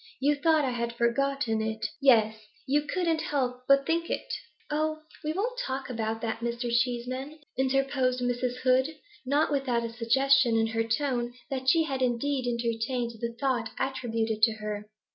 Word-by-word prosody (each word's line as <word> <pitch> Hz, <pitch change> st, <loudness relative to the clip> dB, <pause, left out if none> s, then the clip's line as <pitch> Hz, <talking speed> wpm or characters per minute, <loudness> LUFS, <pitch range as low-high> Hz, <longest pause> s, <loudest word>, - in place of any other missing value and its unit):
You 285 Hz, +3 st, +3 dB
thought 305 Hz, +1 st, +3 dB
I 260 Hz, -, 0 dB
had 235 Hz, -1 st, -2 dB
forgotten 235 Hz, -1 st, +1 dB
it 220 Hz, 0 st, -2 dB, 0.2 s
yes, 220 Hz, -5 st, +5 dB, 0.3 s
you 285 Hz, +2 st, +2 dB
couldn't 335 Hz, -2 st, 0 dB
help 250 Hz, -4 st, -1 dB
but 275 Hz, 0 st, +5 dB
think 335 Hz, +2 st, 0 dB
it -, -, -3 dB, 0.2 s
' -, -, -19 dB
'Oh, 310 Hz, +1 st, -1 dB, 0.2 s
we 305 Hz, -, -1 dB
won't 460 Hz, +9 st, -2 dB
talk 265 Hz, -, -3 dB
about 225 Hz, -1 st, -2 dB
that, 225 Hz, -1 st, -2 dB
Mr. 235 Hz, +1 st, -2 dB
Cheeseman,' 250 Hz, +4 st, -1 dB, 0.2 s
interposed 265 Hz, -1 st, +1 dB
Mrs. 245 Hz, 0 st, -1 dB
Hood, 260 Hz, +4 st, +3 dB, 0.3 s
not 290 Hz, +3 st, +2 dB
without 255 Hz, -4 st, 0 dB
a 230 Hz, -, -6 dB
suggestion 245 Hz, +1 st, +3 dB
in 225 Hz, -, +3 dB
her 225 Hz, 0 st, 0 dB
tone 240 Hz, 0 st, -1 dB, 0.2 s
that 260 Hz, -1 st, 0 dB
she 325 Hz, +4 st, +5 dB
had 270 Hz, -4 st, -3 dB
indeed 255 Hz, +1 st, 0 dB
entertained 235 Hz, 0 st, -1 dB
the 235 Hz, 0 st, -3 dB
thought 250 Hz, -5 st, 0 dB
attributed 225 Hz, -4 st, -1 dB
to 225 Hz, 0 st, +5 dB
her. 210 Hz, -1 st, -5 dB
255 Hz, 165 wpm, -28 LUFS, 235-275 Hz, 0.3 s, yes